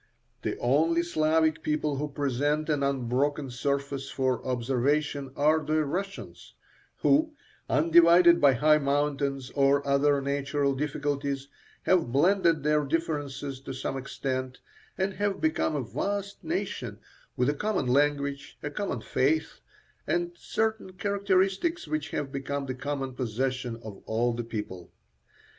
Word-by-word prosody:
The - - -2
only 160 +7 +2
Slavic 160 -1 +2
people 150 -2 -1
who 150 +2 -2
present 145 +2 -1
an 150 -2 +1
unbroken 140 +1 0
surface 140 +1 -2
for 130 -2 -1
observation 135 +3 0
are 155 +2 +3
the 155 +1 +1
Russians, 195 +7 -5 0.5
who, 310 +2 +3 0.3
undivided 170 +3 +6
by 140 -2 +6
high 150 +5 +4
mountains 140 -2 -1
or 140 0 +2
other 140 +1 +3
natural 140 0 0
difficulties, 140 -1 -2 0.3
have 175 -9 +2
blended 170 +1 +3
their 150 0 +2
differences 145 -3 -2
to 135 -1 -7
some 135 +1 -3
extent, 130 -1 -3 0.4
and 190 +1 0
have 205 0 -1
become 315 - +1
a 140 - -1
vast 200 - -3
nation, 165 - -3 0.4
with 125 - +2
a 145 - +2
common 210 +2 -1
language, 140 +2 0
a 145 - -3
common 195 - -3
faith, 150 +7 0 0.5
and 175 0 0
certain 220 +1 -2
characteristics 200 - 0
which 155 0 -2
have 145 -2 -3
become 140 0 -3
the 130 - -3
common 135 0 -4
possession 130 0 -2
of 105 -3 -9
all 120 +2 +1
the 120 +1 -3
people. 105 -6 -6
145 Hz, 130 wpm, -28 LUFS, 135-160 Hz, 0.5 s, undivided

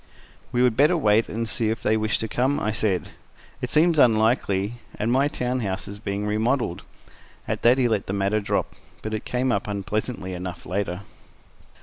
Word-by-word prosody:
"We 125 0 +2
would 125 -3 +3
better 150 +7 +4
wait 110 -6 +3
and 115 +2 -3
see 115 -1 0
if 110 - -3
they 110 - +3
wish 110 -1 +1
to 110 - -3
come," 130 +6 +1
I 110 - 0
said. 105 -4 -1 0.5
"It - - -2
seems 160 0 +4
unlikely, 110 -2 +2 0.2
and 110 +3 -1
my 135 +3 +3
town 125 -2 -2
house 95 -5 -3
is 100 +1 -8
being 100 0 -3
remodeled." 110 -1 0 0.7
At - - -2
that 120 +2 +5
he 130 -2 +3
let 110 -4 0
the 95 - -2
matter 100 +2 +1
drop, 100 - -1 0.3
but 110 - -4
it 110 - -3
came 125 +1 0
up 100 -2 -1
unpleasantly 100 0 -3
enough, 90 0 -6
later. 95 -1 -2
110 Hz, 190 wpm, -24 LUFS, 100-125 Hz, 0.7 s, that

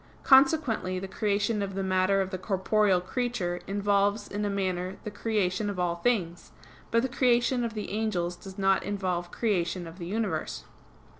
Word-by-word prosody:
Consequently 265 - +4
the 190 +1 -4
creation 205 +2 0
of 195 -1 -3
the 195 - -1
matter 190 +1 +2
of 190 0 -3
the 185 - -4
corporeal 195 0 +2
creature 185 -3 -2
involves 205 +1 +1
in 205 +1 -3
a 205 - 0
manner 185 -2 -2
the 210 - -5
creation 205 -2 -1
of 200 - -4
all 175 -1 0
things; 175 -4 -1 0.4
but 230 +1 +2
the - - +1
creation 245 -1 +2
of 230 -1 -3
the 210 - -4
angels 190 -5 -1
does 190 +1 -11
not 195 -1 +3
involve 185 -3 -2
creation 180 -4 -1
of 165 +3 -11
the 170 - -5
universe. 215 +3 -2
200 Hz, 170 wpm, -28 LUFS, 185-220 Hz, 0.4 s, Consequently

